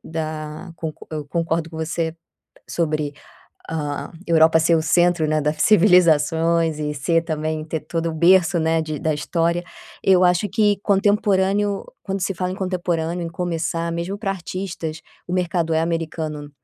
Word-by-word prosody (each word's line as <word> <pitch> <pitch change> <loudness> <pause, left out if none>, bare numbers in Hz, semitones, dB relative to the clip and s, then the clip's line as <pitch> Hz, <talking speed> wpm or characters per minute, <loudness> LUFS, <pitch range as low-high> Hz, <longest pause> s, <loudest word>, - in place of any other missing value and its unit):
da 155 +1 -5
con 160 -2 -4 0.2
eu 155 -2 -4
concordo 165 +1 -1
com 160 - -9
você 160 0 -2 0.5
sobre 155 -3 -1 0.6
a 150 -3 -3 0.2
Europa 160 -1 +5
ser 165 +1 +3
o 160 - +1
centro, 175 +1 +3
né, 155 0 +1
da 150 0 +1
civilizações 165 -3 +4
e 150 0 -2
ser 165 +4 +1
também, 155 -1 -3
ter 160 +1 -3
todo 165 +2 -3
o - - -6
berço, 175 +1 +4
né, 160 0 +1
de 155 -2 -4
da 155 -1 0
história. 170 +3 0 0.4
Eu 185 -1 +5
acho 180 +3 +3
que 210 0 +2
contemporâneo, 200 0 +2 0.2
quando 195 -1 -3
se 195 - -1
fala 180 +1 -2
em 185 - -6
contemporâneo 175 -2 -2
em - - -3
começar 170 -1 -2
mesmo 170 +4 -3
para 205 -2 -2
artistas, 170 -3 -5 0.3
o 175 - -5
mercado 175 -2 0
é 160 - +2
americano. 160 -3 -3
165 Hz, 160 wpm, -21 LUFS, 155-180 Hz, 0.6 s, Europa